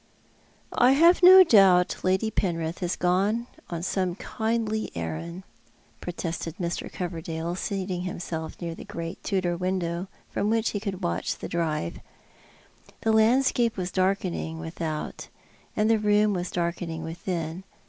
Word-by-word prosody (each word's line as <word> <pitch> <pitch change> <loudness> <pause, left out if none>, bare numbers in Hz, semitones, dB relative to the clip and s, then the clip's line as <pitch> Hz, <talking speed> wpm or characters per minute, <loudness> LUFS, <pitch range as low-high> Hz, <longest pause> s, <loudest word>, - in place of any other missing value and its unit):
" - - -34
I 250 +2 +5
have 335 +6 +6
no 375 +1 +10
doubt 195 - +5
Lady 190 +4 +1
Penrith 165 -4 -1
has 180 -1 -1
gone 195 +6 +1
upon 170 -1 -6
some 185 -1 -1
kindly 220 +1 -2
errand," 85 - -5 0.6
protested 170 -1 -4
Mr. 170 -1 -3
Coverdale, 170 -1 -4
seating 185 -1 -3
himself 170 -3 -5
near 170 -2 -4
the - - -9
great 165 0 -6
Tudor 185 -4 0
window, 180 0 -2 0.2
from 205 - 0
which 225 0 +1
he 205 - -2
could 195 -2 -5
watch 170 - -1
the - - -6
drive. 155 - -2 1.0
The 225 - +2
landscape 235 +1 +3
was 185 -1 -3
darkening 185 -3 -1
without, 160 -1 -5 0.5
and 210 - +2
the 225 -1 +4
room 210 0 +3
was 180 -1 -2
darkening 170 -1 -3
within. 165 +1 -4
180 Hz, 140 wpm, -26 LUFS, 170-210 Hz, 1.0 s, no